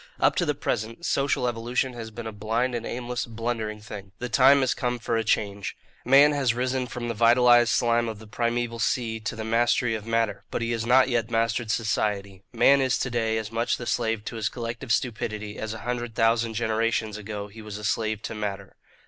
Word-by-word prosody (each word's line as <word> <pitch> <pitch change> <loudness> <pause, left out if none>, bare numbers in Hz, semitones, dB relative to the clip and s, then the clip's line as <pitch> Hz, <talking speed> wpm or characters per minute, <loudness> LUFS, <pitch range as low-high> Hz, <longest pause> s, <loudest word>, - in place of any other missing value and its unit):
Up - - +3
to - - +1
the - - +1
present, 115 +10 -3
social 135 -2 +1
evolution 120 +2 -1
has 115 -2 -7
been 115 +1 -8
a 110 - -4
blind 110 +4 -1
and 115 -1 -3
aimless, 125 0 -3
blundering 115 -2 -3
thing. 100 -2 -9
The 125 - -5
time 135 +4 +6
has 130 - +2
come 125 -2 -2
for 115 0 -2
a 115 - +1
change. 100 -3 -1 0.3
Man 140 +4 +6
has 135 -5 +1
risen 130 +1 -1
from 120 0 -5
the 115 - -1
vitalized 120 +1 +5
slime 120 -1 +2
of 110 - -6
the 110 - -12
primeval 115 +1 -2
sea 115 -1 0
to 110 +1 -4
the 110 - -5
mastery 115 +1 +2
of 110 0 -5
matter; 115 -2 0
but - - -2
he 115 - -1
has 115 -1 -2
not 130 +1 +6
yet 120 -2 0
mastered 115 0 0
society. 105 -4 -1
Man 140 0 +5
is 130 -1 +2
to 125 - -2
day 115 -2 0
as 110 -1 -4
much 115 +1 0
the 120 - -7
slave 115 -3 -1
to 115 - -5
his 110 -1 0
collective 115 0 -5
stupidity, 110 -3 -2
as 110 - -4
a 110 - -9
hundred 120 -2 -3
thousand 115 0 +2
generations 110 -1 0
ago 105 -1 -6
he 110 +2 -12
was 105 -1 -7
a 105 - -9
slave 110 0 -1
to - - -4
matter. 100 -3 -5
115 Hz, 215 wpm, -26 LUFS, 110-120 Hz, 0.3 s, time